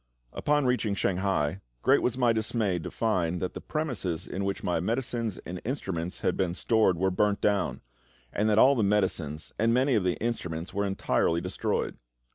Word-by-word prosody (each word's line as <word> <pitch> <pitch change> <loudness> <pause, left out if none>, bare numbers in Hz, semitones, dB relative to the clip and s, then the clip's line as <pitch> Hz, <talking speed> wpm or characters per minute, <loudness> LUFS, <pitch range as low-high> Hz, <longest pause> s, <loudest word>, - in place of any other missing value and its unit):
Upon 150 -1 +1
reaching 125 -5 +1
Shanghai, 95 -3 0 0.2
great - - +5
was 125 0 0
my 120 -3 +3
dismay 110 -4 0
to 80 - -6
find 90 -6 0
that 90 - -3
the - - -7
premises 105 - -3
in 95 - -4
which 100 0 -2
my 85 -2 +1
medicines 115 +1 -2
and 90 +2 -6
instruments 95 - -3
had - - +1
been 90 -2 0
stored 110 -4 +2
were 95 +2 +1
burnt 105 +2 +1
down, 100 -3 0 0.5
and 105 +1 +1
that 105 - +3
all 135 +5 +7
the 125 - +1
medicines 95 -7 0
and 115 +2 +3
many 130 +2 +3
of 105 -5 +2
the 90 -2 +1
instruments 90 -8 -3
were 100 0 0
entirely 90 -3 +1
destroyed. - - -2
100 Hz, 180 wpm, -28 LUFS, 90-115 Hz, 0.5 s, all